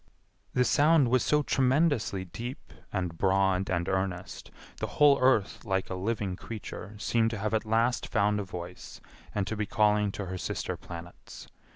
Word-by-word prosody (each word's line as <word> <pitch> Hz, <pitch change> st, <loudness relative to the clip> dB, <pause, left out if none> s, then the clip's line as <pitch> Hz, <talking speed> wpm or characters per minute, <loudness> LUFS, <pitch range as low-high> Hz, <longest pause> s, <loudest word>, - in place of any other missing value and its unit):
The 125 Hz, -, +4 dB
sound 150 Hz, -2 st, +4 dB
was 125 Hz, 0 st, +3 dB
so 150 Hz, 0 st, +2 dB
tremendously 130 Hz, -, +1 dB
deep 120 Hz, -, -8 dB, 0.2 s
and 90 Hz, -4 st, -2 dB
broad 95 Hz, +1 st, +2 dB
and 85 Hz, -2 st, 0 dB
earnest, 95 Hz, -1 st, -3 dB, 0.3 s
the -, -, -3 dB
whole 145 Hz, -2 st, +6 dB
earth 130 Hz, -6 st, +2 dB
like 95 Hz, -3 st, -1 dB
a -, -, -1 dB
living 100 Hz, 0 st, -2 dB
creature 105 Hz, 0 st, -8 dB
seemed 115 Hz, +2 st, +1 dB
to 110 Hz, -, -4 dB
have 105 Hz, +2 st, -2 dB
at 110 Hz, 0 st, +1 dB
last 115 Hz, +3 st, +1 dB
found 105 Hz, -1 st, +1 dB
a -, -, -2 dB
voice 90 Hz, -1 st, -8 dB, 0.4 s
and 100 Hz, -2 st, 0 dB
to 110 Hz, -, -3 dB
be 105 Hz, -1 st, -2 dB
calling 105 Hz, -1 st, +2 dB
to 100 Hz, -, -4 dB
her 95 Hz, 0 st, -5 dB
sister -, -, -3 dB
planets. 85 Hz, 0 st, -10 dB
105 Hz, 170 wpm, -29 LUFS, 95-120 Hz, 0.4 s, whole